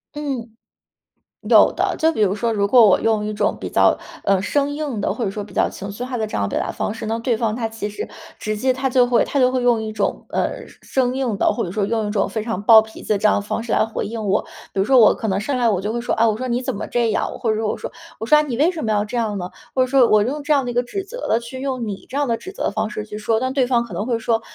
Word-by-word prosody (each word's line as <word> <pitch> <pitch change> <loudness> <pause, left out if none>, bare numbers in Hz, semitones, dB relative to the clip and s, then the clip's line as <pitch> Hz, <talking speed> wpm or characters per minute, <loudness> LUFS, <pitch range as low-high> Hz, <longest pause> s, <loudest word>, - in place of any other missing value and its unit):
嗯。 265 -6 -4 0.9
有 - - +6
的， - - -1
就 320 0 +3
比 220 - -6
如 200 -1 +2
说， 230 +2 -1
如 200 -2 +1
果 235 +1 +7
我 195 - +5
用 220 -2 +1
一 215 - -3
种 205 0 0
比 - - -4
较， - - +3 0.3
呃， 195 -1 +3
生 280 +7 0
硬 290 -7 -3
的， - - 0
或 240 - -4
者 195 - -1
说 210 - -5
比 205 - -10
较 - - +2
情 195 - -8
绪 205 +5 -6
化 250 0 -4
的 220 -1 -1
这 - - -4
样 100 -1 0
表 - - -1
达 - - -2
方 210 - -3
式， 225 - -7
那 225 +1 -1
对 230 -1 0
方 220 -1 -1
他 225 -2 -2
其 220 -2 -5
实 210 - -6 0.3
直 215 0 -3
接 255 +3 +1
他 265 +1 -1
就 250 -1 +4
会 240 -2 +3
他 280 - -1
就 255 -1 +5
会 255 -1 -1
用 240 -2 +3
一 215 0 -5
种， 205 -2 -2
呃， - - -2
生 - - -19
生 255 -1 0
硬 250 -6 -1
的， - - +2
或 - - -2
者 175 - -4
说 200 0 0
用 220 0 -1
一 - - -3
种 210 - +1
非 220 -2 -3
常 220 -4 -3
暴 220 0 +8
脾 220 0 -11
气 - - -12
的 - - +1
这 205 - -3
样 210 - +5
的 - - 0
方 210 +2 -3
式 235 - -5
来 - - +3
回 225 - -4
应 220 0 -5
我。 195 +2 +2 0.3
比 195 - +1
如 - - +3
说 260 +3 +5
我 220 - +6
可 220 - -3
能 190 0 0
上 260 +6 -2
来 235 -2 +3
我 195 - +1
就 210 +4 -3
会 235 - -2
说： 240 - -1
“啊， 230 - +5
我 215 - +1
说 255 +3 -4
你 245 +2 0
怎 250 - -3
么 200 - -4
这 235 -2 +1
样。” - - 0
或 230 - -1
者 215 - 0
说 220 -1 -1
我 - - -2
说， - - -6 0.3
我 225 - -4
说：” 300 - +5
啊， - - +5
你 265 -6 -3
为 310 +5 +4
什 335 -4 -4
么 220 - 0
要 210 0 +1
这 215 - -7
样 220 -4 -1
呢？” 180 0 -5 0.2
或 260 - +2
者 255 - +3
说 255 -2 +4
我 215 -1 +5
用 285 +6 -2
这 305 - -2
样 280 -3 +3
的 245 - -2
一 - - -6
个 245 +1 +1
指 390 +10 -5
责 - - -7
的 225 - +3
去 250 +2 -8
用 255 -4 -3
你 200 -1 -6
这 270 - -4
样 290 -1 +1
的 230 - +1
指 380 - -9
责 - - -6
的 - - 0
方 215 +1 -2
式 210 0 -5
去 210 - -7
说。 220 +1 0
但 260 +2 -2
对 265 -2 +2
方 240 -1 +1
可 210 - -11
能 205 +5 -3
会 235 -2 -1
说， 225 0 0
225 Hz, 355 characters per minute, -21 LUFS, 210-255 Hz, 0.9 s, 暴